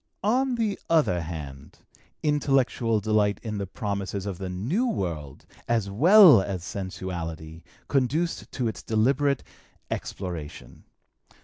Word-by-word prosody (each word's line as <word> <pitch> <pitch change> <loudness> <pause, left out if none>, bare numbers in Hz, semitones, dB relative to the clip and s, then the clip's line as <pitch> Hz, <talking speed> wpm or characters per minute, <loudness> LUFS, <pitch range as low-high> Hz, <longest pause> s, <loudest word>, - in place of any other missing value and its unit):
On 250 +5 +2
the 220 -4 -1
other 115 - +3
hand, 75 -3 -8 0.5
intellectual 135 -6 +1
delight 105 -1 +1
in 105 -3 -4
the 100 - -3
promises 100 0 -4
of 95 -4 -5
the 95 -1 -4
new 130 - -1
world, 80 - -4 0.2
as 115 -4 0
well 165 - +8
as 95 -3 -4
sensuality, 85 -4 -6 0.3
conduced 145 +6 0
to 125 -3 -1
its 110 - -4
deliberate 135 +5 +1 0.5
exploration. 85 -6 -6
105 Hz, 115 wpm, -26 LUFS, 90-140 Hz, 0.5 s, well